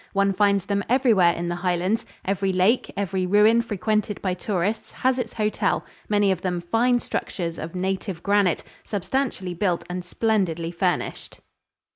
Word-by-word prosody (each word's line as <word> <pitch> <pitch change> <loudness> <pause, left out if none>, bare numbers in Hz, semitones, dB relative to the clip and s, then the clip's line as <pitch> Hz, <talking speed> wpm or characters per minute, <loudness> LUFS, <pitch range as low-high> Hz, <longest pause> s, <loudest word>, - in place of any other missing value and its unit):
One 200 0 +2
finds 200 -1 +2
them 200 0 0
everywhere 230 -9 +4
in 170 0 -4
the 175 0 -2
Highlands. 180 +4 0 0.2
Every 195 0 0
lake, 190 +7 +2
every 190 -2 -1
ruin 210 +4 +5
frequented 215 -1 -1
by 185 -2 -1
tourists 195 +3 -2
has 260 0 +1
its 235 -2 -3
hotel, 215 -1 0 0.2
many 205 -2 +3
of 185 -2 -1
them 180 -2 -1
fine 230 +8 +2
structures 170 -7 -4
of 165 +3 -6
native 190 -1 -3
granite, 200 -3 +2 0.2
substantially 205 -2 -2
built 175 -1 0
and 180 0 -4
splendidly 180 -5 0
furnished. 175 +1 -2
195 Hz, 150 wpm, -24 LUFS, 180-215 Hz, 0.2 s, ruin